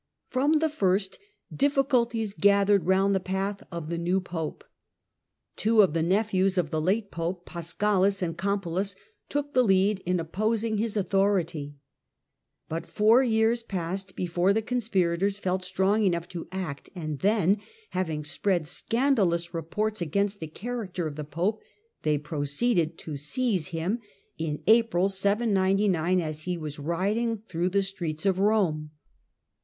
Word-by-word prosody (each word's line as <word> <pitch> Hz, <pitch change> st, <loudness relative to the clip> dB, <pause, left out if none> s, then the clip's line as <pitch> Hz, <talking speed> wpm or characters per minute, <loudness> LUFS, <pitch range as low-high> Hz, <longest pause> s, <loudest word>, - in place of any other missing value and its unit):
From 275 Hz, +4 st, +2 dB
the 320 Hz, +1 st, +2 dB
first, 195 Hz, -9 st, 0 dB, 0.4 s
difficulties 250 Hz, -6 st, +1 dB
gathered 200 Hz, -3 st, +3 dB
round 195 Hz, +1 st, +3 dB
the 190 Hz, -, +2 dB
path 190 Hz, +2 st, -2 dB
of 170 Hz, -3 st, -5 dB
the 170 Hz, -, -2 dB
new 175 Hz, +3 st, +1 dB
Pope. 165 Hz, -4 st, -5 dB, 0.9 s
Two 220 Hz, -1 st, +4 dB
of 185 Hz, -, +1 dB
the 165 Hz, -, +1 dB
nephews 190 Hz, +1 st, +1 dB
of 170 Hz, -4 st, 0 dB
the 155 Hz, -, 0 dB
late 200 Hz, +5 st, 0 dB
Pope, 175 Hz, +2 st, -3 dB
Paschalis 190 Hz, +3 st, 0 dB
and 165 Hz, -2 st, -2 dB
Campulus, 195 Hz, 0 st, -1 dB, 0.3 s
took 290 Hz, 0 st, -2 dB
the 255 Hz, -, +5 dB
lead 195 Hz, -1 st, +3 dB
in 180 Hz, 0 st, 0 dB
opposing 215 Hz, +6 st, -1 dB
his 220 Hz, -1 st, -1 dB
authority. 185 Hz, -7 st, 0 dB, 0.9 s
But 165 Hz, +1 st, -4 dB
four 220 Hz, +4 st, +4 dB
years 230 Hz, -1 st, +2 dB
passed 190 Hz, -2 st, -4 dB
before 180 Hz, +2 st, +1 dB
the 220 Hz, +1 st, 0 dB
conspirators 200 Hz, -5 st, 0 dB
felt 185 Hz, -1 st, -1 dB
strong 190 Hz, +3 st, +1 dB
enough 170 Hz, -3 st, +1 dB
to 170 Hz, -2 st, -6 dB
act, 180 Hz, -7 st, -5 dB
and 155 Hz, -5 st, -4 dB
then, 200 Hz, -1 st, +3 dB, 0.3 s
having 160 Hz, -5 st, -2 dB
spread 175 Hz, +2 st, 0 dB
scandalous 185 Hz, -, +1 dB
reports 210 Hz, +6 st, -2 dB
against 200 Hz, +5 st, 0 dB
the 160 Hz, -, -5 dB
character 195 Hz, -1 st, -4 dB
of 150 Hz, -2 st, -4 dB
the 150 Hz, -, -4 dB
Pope, 175 Hz, +9 st, -2 dB, 0.4 s
they 150 Hz, -1 st, +1 dB
proceeded 155 Hz, +5 st, 0 dB
to 155 Hz, -, -6 dB
seize 185 Hz, -, 0 dB
him, 180 Hz, +6 st, -2 dB, 0.4 s
in 155 Hz, -2 st, -3 dB
April, 220 Hz, -4 st, +4 dB
799, 195 Hz, -3 st, +2 dB
as 155 Hz, -2 st, -4 dB
he 180 Hz, -1 st, -1 dB
was 150 Hz, -2 st, -6 dB
riding 200 Hz, +9 st, 0 dB
through 180 Hz, -4 st, -2 dB
the 200 Hz, +1 st, +2 dB
streets 175 Hz, -4 st, -3 dB
of 190 Hz, -1 st, +2 dB
Rome. 190 Hz, -8 st, +2 dB
190 Hz, 145 wpm, -27 LUFS, 170-210 Hz, 0.9 s, the